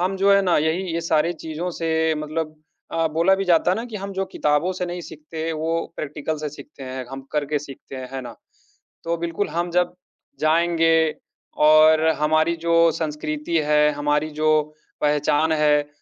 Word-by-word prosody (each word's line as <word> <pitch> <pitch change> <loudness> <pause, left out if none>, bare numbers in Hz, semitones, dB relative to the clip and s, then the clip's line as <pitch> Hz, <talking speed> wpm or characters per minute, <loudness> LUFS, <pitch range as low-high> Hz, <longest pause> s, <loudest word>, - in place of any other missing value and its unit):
हम 185 +2 0
जो 195 +1 +4
है 200 - +5
ना 180 -2 +2
यही 160 +4 0
ये 170 - 0
सारी 165 0 +1
चीज़ों 160 +2 -5
से 160 -1 0
मतलब 155 +1 -4 0.4
अ, 165 0 +1
बोला 165 +5 +3
भी 195 0 -2
जाता 175 -1 +3
है 185 - +1
ना 225 - -3
कि 230 -3 -7
हम 200 0 -6
जो 195 0 -1
किताबों 150 +5 +1
से 180 -1 -3
नहीं 175 0 -5
सीखते 160 0 -8
हैं, 165 - -1
वो 165 +1 -2
प्रैक्टिकल 150 +1 -4
से 150 0 -3
सीखते 140 -1 -12
हैं, 130 0 -5
हम 135 0 -7
करके 150 0 0
सीखते 135 -1 -10
हैं, 130 -1 -7
है 135 - -4
ना? 120 -2 -9 0.7
तो 170 0 -1
बिल्कुल 170 +4 -2
हम 170 +1 -2
जब 180 +1 +1 0.4
जाएँगे 165 0 +3 0.5
और 155 +1 +6
हमारी 155 +2 +2
जो 170 0 0 0.2
संस्कृति 155 0 -3
है, 150 0 +4
हमारी 145 +1 0
जो 155 0 +4 0.4
पहचान 150 +1 +2
है, 150 -1 +3
160 Hz, 185 wpm, -22 LUFS, 150-170 Hz, 0.7 s, और